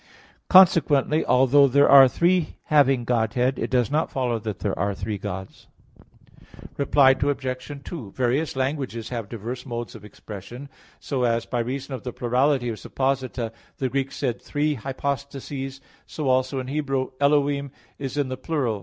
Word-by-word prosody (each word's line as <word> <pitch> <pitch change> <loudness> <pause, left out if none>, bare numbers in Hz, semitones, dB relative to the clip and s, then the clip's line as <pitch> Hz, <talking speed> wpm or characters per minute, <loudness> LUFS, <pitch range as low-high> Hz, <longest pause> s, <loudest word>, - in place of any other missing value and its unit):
Consequently, 160 -5 +5
although 135 +2 +5
there 140 +2 +4
are 135 -1 +9
"three 170 +4 +1 0.2
having 135 -4 +4
Godhead," 125 +2 0
it - - -2
does 125 -1 +1
not 155 +2 +1
follow 125 -3 -1
that 105 -3 -5
there - - -3
are 100 +1 0
three 105 +1 -4
Gods. 95 0 -7 1.1
Reply 140 -1 +4
Obj. 135 0 -2
2: 130 - -7
Various 130 +6 -1
languages 130 -4 -3
have 115 -5 -5
diverse 120 +3 -6
modes 120 -2 -5
of - - -12
expression. 105 +6 -10 0.3
So 135 -3 -3
as 115 -1 +1
by 120 - -2
reason 135 +3 -4
of 130 - -5
the 125 - -6
plurality 125 +1 +1
of 110 - -4
supposita 130 -3 -2 0.3
the 130 - -1
Greeks 135 +1 -2
said 125 -4 -2
"three 150 +1 -1
hypostases," 135 +1 -5 0.3
so 150 -3 -4
also 130 +1 +1
in 130 - -4
Hebrew 135 -1 -2
"Elohim" 140 -1 +2 0.3
is 135 0 -5
in 140 -3 0
the 130 - -4
plural. 130 -7 -2
130 Hz, 155 wpm, -24 LUFS, 120-140 Hz, 1.1 s, are